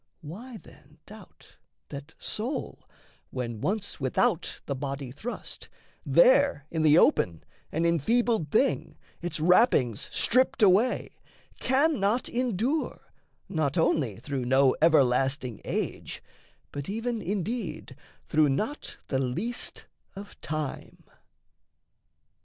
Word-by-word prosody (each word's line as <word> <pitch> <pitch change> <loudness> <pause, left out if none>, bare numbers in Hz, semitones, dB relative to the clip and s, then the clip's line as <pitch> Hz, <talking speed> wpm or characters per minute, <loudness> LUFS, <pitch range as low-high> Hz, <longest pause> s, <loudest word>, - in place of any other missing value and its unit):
Why, 220 - -9
then, 185 - -18
doubt - - -15 0.3
That 145 +3 -9
soul, 235 +7 -4 0.4
when 120 -4 -4
once 200 +1 -2
without 130 -2 0
the - - -2
body 135 -1 -4
thrust, 215 - -8 0.3
There - - +4
in 160 - -1
the 155 0 +6
open, 90 - +3 0.3
an 165 +2 0
enfeebled 195 - +2
thing, 265 - +1 0.2
Its 175 -2 -3
wrappings 160 - +3
stripped 255 -2 +2
away, 205 +6 +3 0.4
cannot 260 -5 +2
endure 250 - -2 0.3
Not 155 -4 -1
only 145 - +2
through 130 +2 -4
no 130 +1 +4
everlasting 135 -5 +3
age, - - -4 0.5
But 145 +2 -6
even, 225 +2 -2
indeed, 190 -2 -3 0.3
through 155 -1 +3
not 215 - -3
the 130 - +1
least 175 - -3 0.3
of 200 +1 -11
time? 155 -2 -5
170 Hz, 105 wpm, -28 LUFS, 140-230 Hz, 0.5 s, the